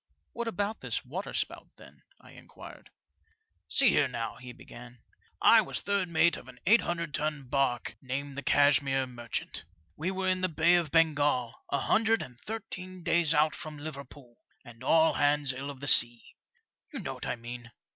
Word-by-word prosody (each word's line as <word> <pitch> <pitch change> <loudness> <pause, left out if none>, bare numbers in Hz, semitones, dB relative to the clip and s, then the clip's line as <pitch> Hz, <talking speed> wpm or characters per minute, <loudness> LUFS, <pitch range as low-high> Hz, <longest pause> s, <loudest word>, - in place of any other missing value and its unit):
What 235 0 -4
about 205 0 -3
this - - -3
waterspout, - - -4
then? - - -16
" - - -32
I - - -17
inquired. - - -13 0.8
See 275 -3 +4
here, 145 - +3
now," 115 -3 -5
he 125 -1 -10
began; 120 0 -13 0.4
I - - +7
was - - -2
third 200 -3 -1
mate 170 +1 +3
of - - -13
an 125 -1 -14
800 175 -6 +2
ton 150 -3 -2
barque, 130 -2 -1
named 140 +2 -5
the 140 - -4
Cashmere 140 -2 +3
Merchant, 120 -2 -5 0.3
We 170 - -3
were 190 0 -2
in 185 0 +1
the 185 - +1
Bay 165 +2 +3
of 170 -3 +2
Bengal, 145 -6 +2 0.2
a 140 - 0
hundred 225 0 +2
and 125 -2 -13
thirteen 185 -3 -7
days 165 -2 +2
out 150 +1 +3
from 155 -3 -7
Liverpool, 140 -4 -10 0.3
and 120 +1 -13
all 160 +4 +4
hands 145 -2 +2
ill 135 +2 -6
of 140 -2 -9
the 140 - -5
sea. 120 -3 +4 0.6
You - - -5
know - - -4
what - - -7
I - - -1
mean. 120 0 -9
145 Hz, 175 wpm, -29 LUFS, 130-170 Hz, 0.8 s, I